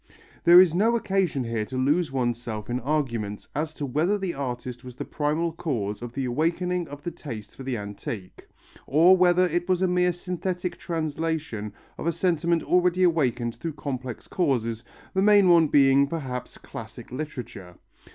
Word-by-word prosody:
There 175 +1 +10
is 180 -3 +6
no 220 +6 +3
occasion 190 - 0
here 115 -2 -2
to 130 - -6
lose 150 +5 +1
oneself 120 -4 -2
in 125 - 0
arguments 120 -7 -2
as 155 +2 -2
to 145 - -3
whether 155 +10 +1
the 190 -3 -3
artist 125 -2 -5
was 125 -1 -10
the - - -5
primal 155 +3 -1
cause 115 -12 -3
of 120 -1 -7
the 135 0 -2
awakening 170 +6 0
of 145 0 -10
the 175 - -3
taste 120 -11 -8
for - - -11
the 130 -2 -2
antique, 100 -1 -7 0.4
or 165 +7 +6
whether 180 0 +4
it 175 +1 -2
was 185 0 +2
a - - +4
mere 180 0 +2
synthetic 180 0 -4
translation 160 -8 -3 0.3
of - - -3
a - - +3
sentiment 170 -1 +1
already 180 0 +2
awakened 125 -9 +1
through 165 -2 -4
complex 130 -4 -5
causes, 120 -9 0 0.3
the 190 - +2
main 200 -2 +6
one 165 -2 +6
being, 140 -1 +5
perhaps, 135 -6 -5
classic - - -10
literature. 125 - -7
150 Hz, 170 wpm, -26 LUFS, 125-175 Hz, 0.4 s, There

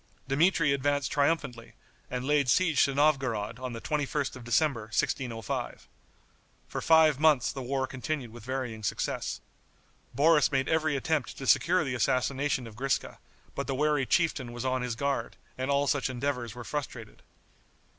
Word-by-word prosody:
Dmitri 150 +1 +3
advanced 145 0 0
triumphantly, 140 -5 -1 0.4
and 125 0 -3
laid 145 -2 +2
siege 165 -1 +4
to 140 - -2
Novgorod 130 -7 +1
on 130 -1 -5
the 115 - -5
21st 145 0 -2
of 130 - -10
December, 120 -1 +1
1605. 115 -6 -3 0.8
For - - -5
five 160 -3 +5
months 150 -5 +4
the 135 - -6
war 130 +1 -1
continued 130 -1 -4
with 120 -1 -12
varying 125 -3 -4
success. 100 - -2 0.7
Boris 150 0 +4
made 135 -1 +1
every 155 -2 +1
attempt 145 0 -1
to 135 - -6
secure 180 +7 +4
the 135 -4 -3
assassination 130 +2 0
of 110 -2 -11
Griska, 135 +2 -2 0.3
but 140 - -4
the 135 - -1
wary 150 -1 +1
chieftain 155 -8 +1
was 120 +1 -5
on 130 0 0
his 125 -2 -3
guard, 135 -2 -2 0.2
and 130 +1 -3
all 140 0 +2
such 140 -2 0
endeavors 125 -3 -3
were 120 - -7
frustrated. 125 -5 -6
135 Hz, 155 wpm, -29 LUFS, 125-145 Hz, 0.8 s, five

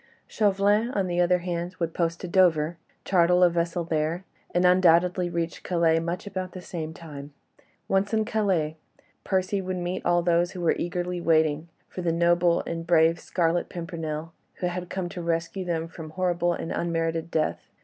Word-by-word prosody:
Chauvelin, 205 +2 +2
on 195 -2 +1
the 175 -1 0
other 180 +1 +4
hand, 175 0 -3
would 165 -2 -2
post 170 -1 -1
to 180 - -4
Dover, 170 -3 +3 0.3
charter 180 0 +4
a - - +5
vessel 170 +1 -1
there, 160 +2 -1 0.3
and 180 +1 +1
undoubtedly 180 0 +4
reach 170 -1 -3
Calais 165 -2 +2
much 170 +3 -3
about 185 -2 -5
the 185 - -7
same 160 -3 -5
time. 150 -3 -10 0.5
Once 195 +1 +1
in 220 -1 +1
Calais, 190 -9 0 0.5
Percy 190 +1 0
would 185 0 -3
meet 180 +1 -3
all 175 0 +2
those 175 0 +2
who 180 - -6
were 170 - +2
eagerly 175 0 -2
waiting 160 -1 +2 0.2
for 185 - -7
the 170 -2 +1
noble 170 +1 +3
and 165 0 -5
brave 165 -1 +4
Scarlet 170 -1 0
Pimpernel, 165 -2 -5 0.2
who - - -4
had 180 0 -3
come 185 -2 -3
to 175 0 -6
rescue 170 +2 -2
them 165 -2 -2
from 160 -1 -9
horrible 175 0 0
and 165 - -5
unmerited 165 -1 -1
death. 155 -2 -1
175 Hz, 175 wpm, -26 LUFS, 165-180 Hz, 0.5 s, a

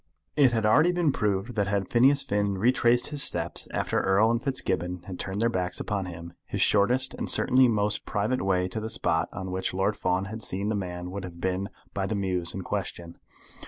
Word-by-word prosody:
It 135 -4 +5
had 115 -2 0
already 155 +11 +5
been 175 -4 +1
proved 105 0 -1
that 100 -3 0
had 100 -1 -2
Phineas 135 +4 +5
Finn 100 -1 -1
retraced 120 +2 +3
his 145 -2 -1
steps - - +3
after - - -1
Erle 100 +4 +3
and 120 0 0
Fitzgibbon 90 -9 -2
had 95 -2 -8
turned 95 +1 -4
their 115 - +2
backs 90 -5 -2
upon 100 -3 -3
him, 85 0 -9
his - - -4
shortest 125 +6 +2
and - - -4
certainly 130 0 +4
most 105 -2 0
private 110 +5 -1
way 90 -1 +1
to 100 - -4
the 110 +1 -5
spot 85 -6 0
on 95 -1 -6
which 95 0 -2
Lord 95 +3 +1
Fawn 95 0 -1
had 110 +3 -7
seen 100 +1 -3
the 110 - 0
man 90 -2 -5
would 100 0 -5
have 85 -2 -9
been 95 +2 -2 0.2
by 95 -1 -2
the 110 - -2
mews 90 -3 -2
in 95 - -5
question. 85 -3 -5
100 Hz, 210 wpm, -27 LUFS, 90-115 Hz, 0.2 s, It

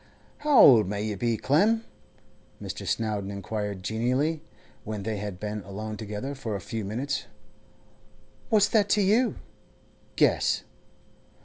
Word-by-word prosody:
'How 295 -2 +3
old 115 -7 +8
may 100 0 -2
you 105 -1 -2
be, 115 +2 0
Clem?' 215 - +2 0.7
Mr. - - -6
Snowdon 105 -3 -1
inquired 100 -1 -4
genially, 130 - 0 0.4
when 105 -2 -5
they 110 0 -2
had 100 -3 -5
been 105 0 -4
alone 105 +2 -6
together 105 +6 -5
for 115 -6 -4
a - - -3
few 110 +4 -5
minutes. 130 +7 -3 1.2
'What's 210 -4 +4
that 205 -3 +2
to - - +3
you? 225 +6 +3 0.8
Guess. - - +2
110 Hz, 130 wpm, -27 LUFS, 105-145 Hz, 1.2 s, old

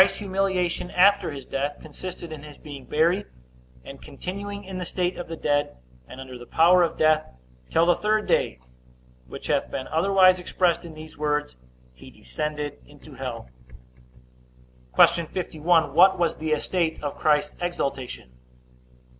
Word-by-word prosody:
Christ's - - +4
humiliation 190 -3 -1
after 200 +2 +4
his 140 -3 -7
death 140 +2 -3
consisted 170 +2 -8
in 155 -2 -7
his 150 -1 -12
being 140 -3 -10
buried, 170 +6 +2 0.6
and 135 - -10
continuing 200 +6 -6
in 190 -1 -6
the - - -3
state 180 +1 -2
of 175 - -6
the 165 - -5
dead, 145 -2 0 0.3
and 130 - -11
under 130 -2 -9
the 120 - -11
power 175 +6 +5
of 170 -2 +1
death 155 0 +3 0.4
till 165 - +3
the 175 - +5
third 215 +3 0
day; 65 - +1 0.7
which - - -9
hath - - 0
been 130 - -5
otherwise 185 +2 +4
expressed 180 -1 0
in 165 -2 -10
these 155 0 -11
words, 150 - -1 0.4
He 60 - -14
descended 150 - -5
into - - -15
hell. 60 - -6 1.5
Q. 170 -2 +5
51. 165 -3 +1
What 190 +4 +6
was 170 -2 0
the 155 0 -3
estate 160 +1 -1
of 145 - -3
Christ's 150 -1 +2
exaltation? 135 - -3
160 Hz, 155 wpm, -25 LUFS, 145-180 Hz, 1.5 s, What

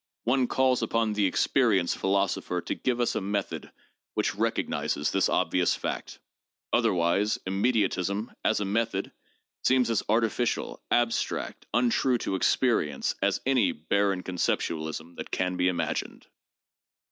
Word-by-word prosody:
One 125 +1 +2
calls 130 -1 +2
upon 115 -2 0
the 105 -2 +2
experience 100 -3 +2
philosopher 95 -2 0
to - - -3
give 125 -1 -1
us 120 - +1
a - - -1
method 100 +1 -3 0.4
which - - +1
recognizes 75 - -1
this 95 - +2
obvious 90 0 +2
fact. - - -5 0.6
Otherwise, 90 +5 +2
immediatism, 100 0 0
as - - +2
a 105 - -1
method, 105 -1 -1 0.5
seems 125 -2 +3
as 110 - +1
artificial, 115 +2 0
abstract, 120 -1 0
untrue 125 +1 +2
to 105 - -3
experience, 95 - +1
as 100 0 +1
any 125 -9 +3
barren 95 +3 0
conceptualism 80 -2 -2
that - - -6
can 90 0 -1
be 90 0 +1
imagined. 90 -2 -2
100 Hz, 125 wpm, -27 LUFS, 90-115 Hz, 0.6 s, seems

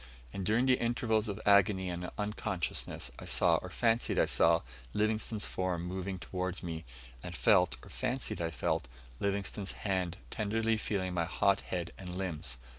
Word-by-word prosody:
And 100 - -3
during 110 +6 +3
the 130 -1 +4
intervals 115 -2 +1
of 100 +1 -4
agony 100 -2 +5
and 90 0 -3
unconsciousness, 105 - -2
I - - -8
saw, - - +4
or - - -6
fancied 115 0 +2
I - - +5
saw, - - +4 0.3
Livingstone's 110 0 +1
form 90 -2 -2
moving 95 +1 -3
towards 90 0 -4
me, 80 -3 -5 0.4
and - - -6
felt, 90 -7 +4
or - - -12
fancied 130 -6 -2
I 80 - 0
felt, 70 -4 -1 0.3
Livingstone's 100 -1 -1
hand 95 -2 0
tenderly 110 +1 +1
feeling 95 -4 -1
my 85 -2 +1
hot 95 +3 +2
head 85 -2 -4
and 90 -2 -6
limbs. 80 -8 -2
95 Hz, 160 wpm, -32 LUFS, 90-110 Hz, 0.4 s, agony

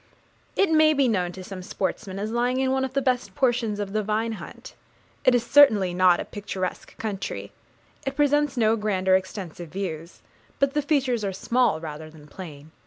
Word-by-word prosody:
It 390 -4 +2
may 310 -1 +5
be 275 -2 +3
known 180 -6 0
to 185 - -9
some 185 0 -8
sportsmen, 190 +1 -4
as 210 +2 -3
lying 245 +2 +1
in 265 0 +1
one 265 0 +1
of 265 -1 -3
the 275 0 0
best 250 -1 0
portions 240 -6 +1
of 200 -1 -4
the 215 - +1
Vine 215 +2 -1
Hunt. 220 - -9 0.5
It 255 - +5
is 240 - +1
certainly 220 -11 +5
not 180 -1 +4
a - - -3
picturesque 190 -3 -5
country; 190 - -4 0.5
it 270 0 -3
presents 290 -1 +2
no 225 -1 +3
grand 205 -4 -2
or 185 - +6
extensive 185 -3 -4
views; 170 -2 -6 0.3
but 275 0 +1
the 295 - +1
features 270 -6 +1
are 195 - -1
small 235 -2 +1
rather 155 -1 -7
than 155 -2 -15
plain. 155 -2 -10
215 Hz, 190 wpm, -25 LUFS, 185-260 Hz, 0.5 s, or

